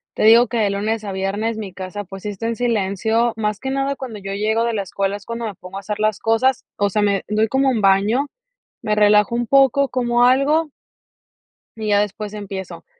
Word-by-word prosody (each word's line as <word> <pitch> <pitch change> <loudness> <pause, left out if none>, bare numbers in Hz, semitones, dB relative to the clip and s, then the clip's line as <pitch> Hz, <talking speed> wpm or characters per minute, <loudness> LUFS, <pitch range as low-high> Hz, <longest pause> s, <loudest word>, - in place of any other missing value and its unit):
te - - -1
digo 230 +2 +7
que 235 - -3
de 205 -2 +2
lunes 215 +2 -2
a 200 - -5
viernes 205 +4 -2
mi 200 -3 -6
casa, 190 +2 -6
pues, 195 0 -11
sí 210 - -3
está 205 +3 -4
en 230 - -1
silencio, 225 0 0
más 210 -2 -2
que 265 - -4
nada 275 +1 -1
cuando 250 -6 -7
yo 195 0 -7
llego 220 +3 0
de 235 -1 0
la 205 - -1
escuela 195 +1 -2
es 200 - -17
cuando 230 0 -4
me 215 - -4
pongo 185 +1 -10
a 200 - -5
hacer 210 +1 -5
las 215 -1 +1
cosas, 230 +4 +1
o 200 0 +1
sea, 210 +2 0
me 200 -1 +1
doy 215 +1 +1
como 270 +2 +2
un 230 -5 0
baño, 200 +7 +3 0.6
me 215 -2 0
relajo 210 +2 +4
un 240 0 0
poco, 275 0 +4
como 240 -1 +2
algo 290 +5 +3 1.1
y 220 -1 -5
ya 205 0 +4
después 210 +1 -4
empiezo, 195 -2 -7
215 Hz, 220 wpm, -20 LUFS, 200-235 Hz, 1.1 s, digo